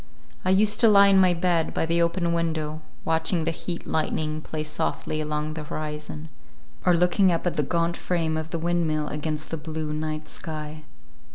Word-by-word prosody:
I - - 0
used 210 +2 +4
to 230 - +6
lie 200 -2 +7
in 195 -1 +6
my 180 -1 +4
bed 170 -1 +1
by - - +1
the 170 +1 +1
open 170 0 +1
window, 160 -2 -1 0.2
watching 160 +1 +1
the 165 - 0
heat 170 +1 -5
lightning 155 0 -1
play 155 0 -4
softly 155 0 -2
along 150 0 -2
the 155 -1 -5
horizon, 150 0 -5 0.5
or 180 - +4
looking 180 +2 +4
up 165 +1 -1
at 175 - 0
the - - +2
gaunt 170 +3 0
frame 165 -3 -1
of 160 0 -3
the 165 - -2
windmill 160 -3 0
against 155 0 -4
the 165 - -2
blue 155 0 -4
night 155 0 -3
sky. 155 -1 -7
160 Hz, 185 wpm, -25 LUFS, 155-170 Hz, 0.5 s, lie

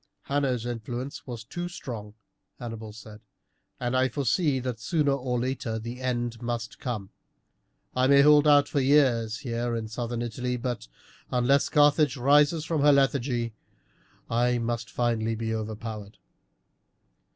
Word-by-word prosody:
"Hanno's 135 -4 0
influence 120 +4 -5
was 120 -3 -6
too 175 +10 -5
strong," 110 -10 -7 0.4
Hannibal 115 -2 -7
said, 105 0 -12 0.6
"and 120 0 -1
I 130 0 +3
foresee 140 +2 +1
that 125 -2 -4
sooner 145 +7 +1
or 125 -3 -1
later 125 -2 -2
the 120 +3 -6
end 120 -2 -2
must 120 -2 -4
come. 110 -6 -4 0.8
I 130 0 +3
may 140 0 +7
hold 150 0 +6
out 145 -1 +6
for 145 - 0
years 130 -6 +3
here 120 -1 -2
in 115 -1 -3
Southern 120 +1 -3
Italy, 125 +2 -3
but 120 -1 -4 0.4
unless 125 +3 +2
Carthage 145 -1 +4
rises 145 +5 +4
from 160 -3 0
her 145 +1 +6
lethargy, 130 -4 +1 0.7
I 120 +1 +2
must 115 0 -3
finally 115 -2 0
be 110 0 -3
overpowered." 110 -1 -6
120 Hz, 140 wpm, -27 LUFS, 115-140 Hz, 0.8 s, may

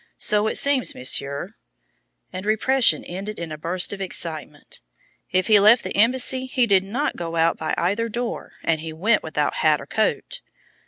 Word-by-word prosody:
So 210 0 +2
it - - -2
seems, 280 -2 +1
Monsieur," 140 +2 0 0.8
and 185 - -6
repression 230 +5 +2
ended 195 +4 -7
in 170 -2 -6
a 155 - -6
burst 180 +5 +1
of 195 - -7
excitement, 155 - -4 0.5
"if 185 0 +1
he 210 0 +5
left 215 +4 +5
the - - -5
embassy 255 +4 +2
he 255 -1 +1
did 195 -4 +3
not 245 +10 -3
go 170 -1 -5
out 165 0 +2
by 160 - -3
either 205 +7 -1
door, 240 +2 -5
and 160 -2 0
he 160 0 -6
went 200 +9 +1
without - - -2
hat - - +2
or - - -9
coat!" - - -2
200 Hz, 175 wpm, -22 LUFS, 165-230 Hz, 0.8 s, he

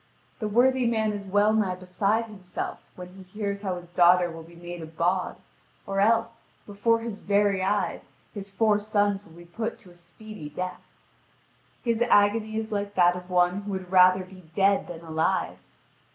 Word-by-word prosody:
The 215 - -2
worthy 250 +3 +3
man 220 -2 +1
is 200 -1 -6
well 205 +2 +3
nigh 205 -4 +1
beside 195 +5 0
himself 195 -5 -6 0.2
when 180 0 -9
he 190 +1 -13
hears 200 +1 -4
how 190 -3 -2
his 175 -1 -8
daughter 175 0 +4
will 165 0 -9
be 165 +1 -15
made 175 0 -8
a 160 - -7
bawd, 175 +3 -1 0.5
or 195 0 -2
else, 230 +2 +2 0.2
before 225 +3 +1
his 225 -3 -6
very 200 -1 +2
eyes, 200 +2 -1 0.2
his 200 -2 -7
four 210 +1 +2
sons 205 -1 0
will 165 - -18
be 170 +1 -13
put 220 +7 -4
to 180 - -17
a - - -19
speedy 175 0 -10
death. 180 +4 -5 1.0
His 235 -1 0
agony 220 -1 +3
is 220 0 -4
like 205 -1 -3
that 175 -1 +4
of 180 0 -9
one 180 +2 +2
who 200 0 -5
would 185 -1 -6
rather 185 0 +6
be 185 -3 -15
dead 195 0 +3
than 170 -2 -8
alive. 160 -1 -1
195 Hz, 180 wpm, -26 LUFS, 180-215 Hz, 1.0 s, rather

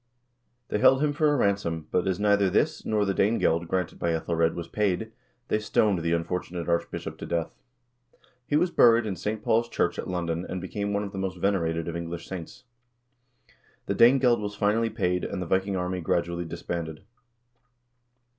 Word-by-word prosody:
They 105 - 0
held 135 +6 +5
him 150 -1 +1
for 150 0 +2
a - - +2
ransom, 90 -8 0
but 90 - +1
as 95 0 0
neither 100 -2 +3
this, - - +1
nor 105 -1 +1
the 95 - 0
Danegeld 90 -5 +1
granted 90 -1 -2
by 85 - 0
^Ethelred, 80 0 0
was 85 -1 -5
paid, 105 +3 -1 0.4
they 105 - +1
stoned 105 -2 +2
the 85 0 -1
unfortunate 85 0 -3
archbishop 85 0 -2
to - - -6
death. 85 -1 -1 1.0
He 145 - 0
was 175 +3 +2
buried 115 -5 +5
in 100 -3 -2
St. 105 +4 -4
Paul's 115 +1 +2
church - - 0
at - - -4
London, 85 -1 -2
and 95 - -3
became 100 +3 -3
one 100 0 0
of 100 - -6
the 95 - -6
most 95 -1 -3
venerated 85 -4 0
of 85 - -4
English 85 0 -5
saints. 90 -4 -8 1.2
The - - -1
Danegeld 125 -2 +5
was 105 0 -4
finally 105 +3 +1
paid, 90 -5 -1
and - - -3
the 90 - -3
Viking 95 +3 0
army 90 0 -2
gradually 85 +1 -1
disbanded. 80 0 -5
95 Hz, 180 wpm, -27 LUFS, 85-105 Hz, 1.2 s, held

